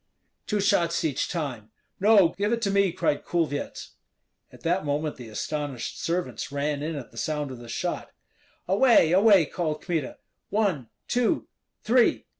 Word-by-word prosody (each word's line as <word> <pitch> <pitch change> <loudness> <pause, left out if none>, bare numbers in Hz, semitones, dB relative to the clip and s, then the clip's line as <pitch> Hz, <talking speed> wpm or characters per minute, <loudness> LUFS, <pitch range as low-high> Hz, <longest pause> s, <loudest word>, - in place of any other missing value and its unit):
"Two 210 - 0
shots 170 -4 +2
each 140 -4 -1
time!" 130 - -4 0.3
"No; 200 -3 +6
give 205 +5 -2
it 235 - +1
to 200 - +1
me," 200 -2 +3
cried 145 - 0
Kulvyets. 160 -4 -2 0.6
At - - -16
that 175 +3 0
moment 150 +1 -2
the 120 -3 -9
astonished 145 +2 -4
servants 175 -3 -2
ran 145 0 -1
in 155 +2 -3
at 135 -5 -7
the 115 - -16
sound 150 +2 -2
of 125 - -8
the 120 -1 -11
shot. - - -3 0.6
"Away! 200 -3 +5
away!" 195 -2 +6
called 155 0 -3
Kmita. 160 -7 -2 0.3
"One! 190 - 0 0.2
two! 245 -1 +1 0.4
three!" 240 +1 +3
165 Hz, 155 wpm, -26 LUFS, 145-200 Hz, 0.6 s, No